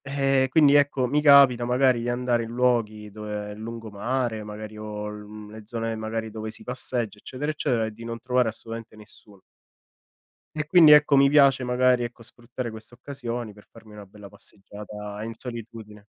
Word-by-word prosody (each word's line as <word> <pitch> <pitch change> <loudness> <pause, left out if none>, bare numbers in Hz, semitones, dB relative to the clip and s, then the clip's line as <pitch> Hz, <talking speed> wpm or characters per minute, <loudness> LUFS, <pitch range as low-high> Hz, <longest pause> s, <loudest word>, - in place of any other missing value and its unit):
Eh 135 -1 +1
quindi 145 0 +5
ecco, 145 -2 +3
mi 145 +4 +1
capita 140 -4 +6
magari 125 0 +2
di 120 - -3
andare 120 -1 0
in 115 - -6
luoghi 115 -4 0
dove 105 0 -6
il 105 - -10
lungomare, 115 +1 -4
magari 105 0 -9
o 105 -1 -6
l 105 0 -9
mhmm, 105 0 -11
le 110 0 -10
zone 115 0 -4
magari 110 0 -4
dove 110 0 -6
si - - -8
passeggia, 120 -4 -4
eccetera, 145 +7 -4
eccetera 120 -6 -1
e 110 - -5
di 115 +2 -12
non 115 0 -6
trovare 125 0 +1
assolutamente 115 0 -7
nessuno. 105 -2 -17 1.1
E 155 -1 -2
quindi, 160 -2 +7
ecco 150 -1 +6
mi 140 0 +5
piace 140 -3 +4
magari, 125 0 +2
ecco 120 0 -8
sfruttare 120 +1 -8
queste 110 +2 -12
occasioni, 120 -4 -6
per 105 0 -19
farmi 110 -2 -16
una 105 -1 -11
bella 100 +1 -14
passeggiata 105 0 -10
in 115 +1 -6
solitudine. 110 -3 -10
115 Hz, 180 wpm, -25 LUFS, 105-125 Hz, 1.1 s, quindi